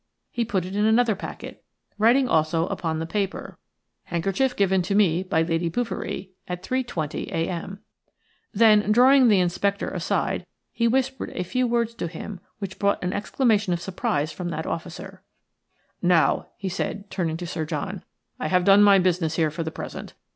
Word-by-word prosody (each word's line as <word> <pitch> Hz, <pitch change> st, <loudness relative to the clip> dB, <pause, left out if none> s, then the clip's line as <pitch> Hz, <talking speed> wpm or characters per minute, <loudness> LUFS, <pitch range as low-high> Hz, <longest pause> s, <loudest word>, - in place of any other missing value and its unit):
He 240 Hz, -, -1 dB
put 195 Hz, -6 st, -1 dB
it 185 Hz, +2 st, -6 dB
in 210 Hz, -, +1 dB
another 225 Hz, +1 st, +4 dB
packet, 195 Hz, -, -8 dB, 0.4 s
writing 245 Hz, +5 st, +4 dB
also 160 Hz, -3 st, +2 dB
upon 160 Hz, -2 st, -2 dB
the 160 Hz, -, -3 dB
paper:– 195 Hz, +3 st, -3 dB, 0.5 s
"Handkerchief 195 Hz, +10 st, 0 dB
given 190 Hz, -2 st, +2 dB
to 195 Hz, +3 st, -1 dB
me 185 Hz, -5 st, +3 dB
by 180 Hz, -4 st, +1 dB
Lady 165 Hz, +1 st, 0 dB
Bouverie 225 Hz, -2 st, -4 dB, 0.2 s
at 180 Hz, 0 st, -5 dB
3.20 240 Hz, -, -3 dB
a.m." 175 Hz, +4 st, -3 dB, 0.7 s
Then, 210 Hz, -1 st, +4 dB
drawing 255 Hz, +3 st, +6 dB
the 205 Hz, -4 st, +5 dB
inspector 195 Hz, +3 st, 0 dB
aside, -, -, -1 dB, 0.2 s
he 235 Hz, -, +1 dB
whispered 265 Hz, +1 st, 0 dB
a 180 Hz, -, -1 dB
few 255 Hz, +7 st, 0 dB
words 235 Hz, -1 st, 0 dB
to 175 Hz, -, -4 dB
him 180 Hz, +4 st, -7 dB, 0.2 s
which 195 Hz, -3 st, -7 dB
brought 200 Hz, -2 st, +1 dB
an 180 Hz, +1 st, -1 dB
exclamation 210 Hz, -2 st, +1 dB
of 170 Hz, -, -1 dB
surprise 155 Hz, -4 st, -2 dB
from 175 Hz, +2 st, -5 dB
that 170 Hz, -, -4 dB
officer. -, -, -6 dB, 0.8 s
"Now," 170 Hz, -5 st, +3 dB
he 195 Hz, -, -5 dB
said, 200 Hz, +2 st, -4 dB
turning 165 Hz, -4 st, -2 dB
to 175 Hz, -, -6 dB
Sir 165 Hz, -2 st, -3 dB
John, 170 Hz, +5 st, -4 dB, 0.4 s
"I -, -, -2 dB
have 180 Hz, +2 st, +2 dB
done 200 Hz, +1 st, +7 dB
my 200 Hz, -1 st, +7 dB
business 180 Hz, -3 st, +1 dB
here 160 Hz, -2 st, +1 dB
for 155 Hz, -, -5 dB
the 160 Hz, -, -2 dB
present. -, -, -8 dB
190 Hz, 170 wpm, -24 LUFS, 170-215 Hz, 0.8 s, done